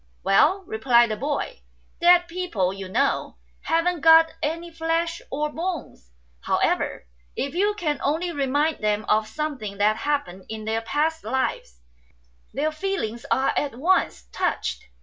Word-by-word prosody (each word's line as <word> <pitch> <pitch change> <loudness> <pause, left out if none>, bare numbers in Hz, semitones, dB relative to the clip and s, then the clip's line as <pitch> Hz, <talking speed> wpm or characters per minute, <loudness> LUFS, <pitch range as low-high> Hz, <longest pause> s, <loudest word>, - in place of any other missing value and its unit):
"Well," 320 - +4
replied 235 -2 +3
the - - 0
boy, 290 - -3 0.4
"dead 350 0 +6
people, 335 - -1
you 195 -1 -7
know, 275 +8 0 0.3
haven't 330 +1 +1
got 325 +1 +7
any 335 +3 -3
flesh 330 +1 -1
or 300 +2 -2
bones; 330 - -5 0.3
however, - - 0 0.3
if 275 - -3
you 410 +4 +1
can 305 -7 -1
only 325 +5 0
remind 290 +1 0
them 210 0 +1
of 215 0 +2
something 255 -7 -4
that 210 +2 +3
happened 195 -11 -2
in 220 -1 -6
their 220 +1 -1
past 305 +7 -1
lives, 220 - -2 0.7
their 305 +2 -1
feelings 310 - -3
are 265 - +2
at 280 -5 -1
once 330 - +1
touched. - - -2
295 Hz, 140 wpm, -24 LUFS, 220-330 Hz, 0.7 s, got